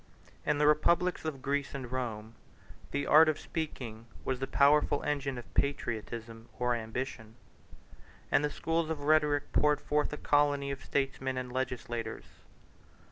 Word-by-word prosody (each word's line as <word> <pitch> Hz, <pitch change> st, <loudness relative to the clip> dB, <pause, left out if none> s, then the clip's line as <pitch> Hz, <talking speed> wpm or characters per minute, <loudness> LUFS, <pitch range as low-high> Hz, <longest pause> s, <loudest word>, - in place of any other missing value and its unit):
In 150 Hz, 0 st, +3 dB
the 150 Hz, -, +3 dB
republics 170 Hz, +4 st, +3 dB
of 140 Hz, -4 st, -4 dB
Greece 140 Hz, 0 st, -1 dB
and 130 Hz, -3 st, -6 dB
Rome, 115 Hz, -4 st, -4 dB, 0.6 s
the 140 Hz, 0 st, -2 dB
art 155 Hz, +2 st, +7 dB
of 155 Hz, -, -1 dB
speaking 120 Hz, -8 st, -5 dB, 0.2 s
was 130 Hz, -1 st, -1 dB
the 135 Hz, -, -2 dB
powerful 145 Hz, 0 st, +4 dB
engine 140 Hz, -3 st, -1 dB
of 120 Hz, -, -10 dB
patriotism 115 Hz, -4 st, -2 dB
or 125 Hz, -1 st, +1 dB
ambition; 110 Hz, -1 st, -5 dB, 1.0 s
and -, -, +4 dB
the 150 Hz, -, +1 dB
schools 165 Hz, +2 st, -1 dB
of 160 Hz, -3 st, -3 dB
rhetoric 150 Hz, -1 st, +2 dB
poured 150 Hz, -1 st, +3 dB
forth 150 Hz, 0 st, 0 dB
a 150 Hz, -, -4 dB
colony 145 Hz, -1 st, +2 dB
of 135 Hz, -1 st, -6 dB
statesmen 135 Hz, -1 st, -1 dB
and 125 Hz, -1 st, -4 dB
legislators. 120 Hz, -3 st, -3 dB
140 Hz, 145 wpm, -31 LUFS, 125-150 Hz, 1.0 s, art